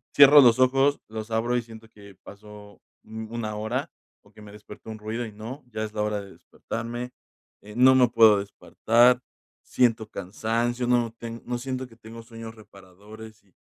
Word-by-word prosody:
cierro 145 +1 +9
los 120 -3 +5
ojos, 135 +2 +3
los 110 0 -7
abro 115 +2 -1
y 120 - +1
siento 115 -1 -14
que 100 -2 -16
pasó, 105 0 -14 0.2
mm, 110 0 -9
1 110 -2 -4
hora 110 +6 -4 0.3
o - - -22
que - - -17
me 105 -1 -13
despertó 105 +1 -13
un 110 - -7
ruido 110 +3 -4
y 110 - -9
no, 115 +7 -9
ya 110 -2 -5
es 110 -1 -6
la 105 - -3
hora 105 0 -1
de 100 -1 -13
despertarme, 120 +2 -7 0.5
eh, 105 +1 -13
no 130 +1 +6
me 130 -1 +5
puedo 110 -3 +5
despertar, 120 +4 +2 0.4
siento 115 -3 0
cansancio, 115 +6 -3
no 120 -2 +1
ten 115 0 -8
no 120 0 -3
siento 130 +1 -5
que 115 - -19
tengo 115 0 -12
sueños 115 -1 -10
reparadores 105 +2 -15
y 95 -3 -33
115 Hz, 185 wpm, -25 LUFS, 105-120 Hz, 0.5 s, cierro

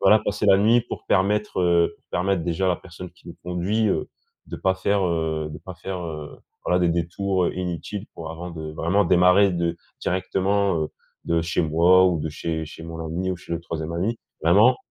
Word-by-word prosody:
Voilà, 110 - +6
passer 105 0 -2
la 95 -1 +6
nuit 115 +4 +5
pour 120 - -8
permettre, 105 +1 +1
heu, 85 -1 +3
permettre, 95 0 0
déjà, 85 +3 -1
à - - +3
la 90 - +2
personne 90 0 -10
qui 85 0 -18
nous - - -9
conduit, 90 +5 0
heu, - - -1 0.4
de - - -6
pas 95 0 +1
faire, 100 +1 +1
heu, 80 -2 -1
de 75 - -7
pas 95 - -9
faire, 95 +2 -5
heu, 75 -3 -7 0.3
voilà, 90 - +2
des 90 - +2
détours, 90 +2 0
heu, - - -1
inutiles, 90 +3 -4
pour, 80 -1 -7
avant 85 +2 -7
de 80 -2 -6
vraiment 85 +6 +1
démarrer 90 +3 +5
de 85 -1 -1 0.2
directement, 95 +1 0
heu, - - -5 0.4
de 85 0 +1
chez 85 - 0
moi 85 +4 +5
ou 85 -4 +1
de 80 - -2
chez 80 +1 -3
chez 80 - -11
mon 80 0 -6
ami 85 +4 -2
ou - - -4
chez 90 - -9
le 85 - -2
3e 80 -1 -5
ami. 100 +7 -1 0.2
Vraiment! 105 +10 +5
90 Hz, 210 wpm, -24 LUFS, 85-95 Hz, 0.4 s, Voilà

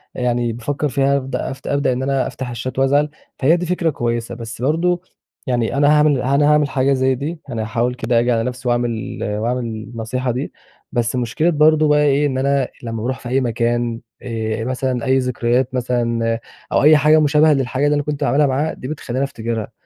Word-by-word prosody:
يعني 120 -2 0
بافكر 145 +6 -2
فيها 140 +1 +2
هابد 135 -1 -3
افت 135 +1 -5
أبدأ 140 -2 +1
إن 130 +2 -3
أنا 135 -1 0
أفتح 130 -2 -6
الشات 120 +3 -4
وأزعل، 145 +2 +3 0.3
فهي 160 +6 +4
دي 180 - -3
فكرة 175 -1 0
كويسة، 120 -4 -2
بس 115 0 -8
برضه 170 +5 +1 0.5
يعني 120 +1 0
أنا 145 0 +4
هاعمل 150 -3 +3
أنا 140 +3 +2
هاعمل 150 -2 +3
حاجة 135 0 +2
زي 130 0 +2
دي، 155 +6 -5
أنا 115 -3 -3
هاحاول 115 +3 -1
كده 120 -2 +1
أجي 120 +1 +1
على 115 -1 +1
نفسي 125 0 -4
وأعمل 120 -2 -1
وأعمل 115 +4 -1
النصيحة 115 +3 -4
دي. 130 +5 -4 0.4
بس 120 -1 0
مشكلة 125 +7 0
برضه 155 0 +4
بقى 150 0 +4
ايه 145 0 +3
إن 130 -2 -2
أنا 140 -1 +1 0.2
لما 115 -1 -4
باروح 130 +3 -2
في 120 - -8
أي 135 +1 +2
مكان 120 0 -1 0.2
آآ 115 -2 -3
مثلًا، 130 -1 -2
أي 130 0 +3
ذكريات 125 0 0
مثلًا، 115 -2 0 0.3
أو - - +2
أي 155 0 +7
حاجة 155 +2 +5
مشابهة 150 +1 +4
للحاجة 135 +1 0
اللي 150 0 +3
أنا 145 - 0
كنت 150 0 -4
باعملها 140 +2 +3
معاها، 145 +4 0
دي 130 - -8
بتخليني 150 -4 -6
إن - - +1
أنا - - +2
افتكرها. 115 -4 -4
130 Hz, 200 wpm, -19 LUFS, 120-145 Hz, 0.5 s, أي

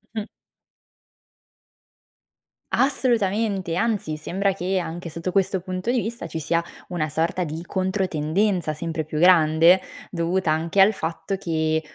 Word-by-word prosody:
Mh-mh. 215 -2 -2 2.5
Assolutamente, 215 - +1
anzi, 205 -7 -1
sembra 195 +6 -1
che 185 0 -1
anche 170 0 -5
sotto 165 +3 -4
questo 190 0 +1
punto 185 +4 -3
di 250 - +2
vista 230 -5 -5
ci 165 - -5
sia 165 +2 +1 0.3
una 175 -4 -1
sorta 165 +4 0
di 160 0 -5
controtendenza 185 -1 0
sempre 160 0 -4
più 155 0 -4
grande, 165 0 +6 0.3
dovuta 170 0 0
anche 165 +5 +2
al 195 +2 +7
fatto 170 +1 -4
che, 160 -3 0
180 Hz, 125 wpm, -23 LUFS, 160-195 Hz, 2.5 s, al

